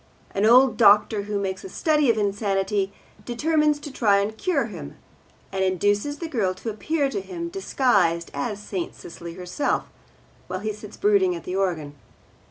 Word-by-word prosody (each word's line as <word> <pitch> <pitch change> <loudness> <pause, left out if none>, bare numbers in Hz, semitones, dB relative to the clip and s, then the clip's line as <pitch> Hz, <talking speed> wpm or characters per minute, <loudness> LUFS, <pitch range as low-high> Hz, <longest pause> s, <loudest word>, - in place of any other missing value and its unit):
An 200 +2 +2
old 255 +2 +6
doctor, 210 -1 +5
who 210 - 0
makes 190 -1 -3
a 385 - -7
study 300 -7 +2
of 225 - +3
insanity, 200 -1 0 0.3
determines 300 +4 +1
to 290 - -7
try 210 -6 +3
and 205 +2 -1
cure 365 +10 0
him, - - -9 0.5
and 190 0 0
induces 205 - +1
the 335 - -5
girl 210 - 0
to 225 +4 -5
appear 285 +7 0
to 390 +9 -3
him, 340 -3 -6
disguised 200 - +1
as 145 +9 -3
St. 195 -4 -5
Cecily 170 0 -9
herself, 180 +10 -1 0.6
while 185 +1 -4
he 215 0 -2
sits 210 0 -11
brooding 195 -3 +3
at 170 - -7
the 180 - -4
organ. 170 -7 -1
205 Hz, 170 wpm, -24 LUFS, 190-270 Hz, 0.6 s, old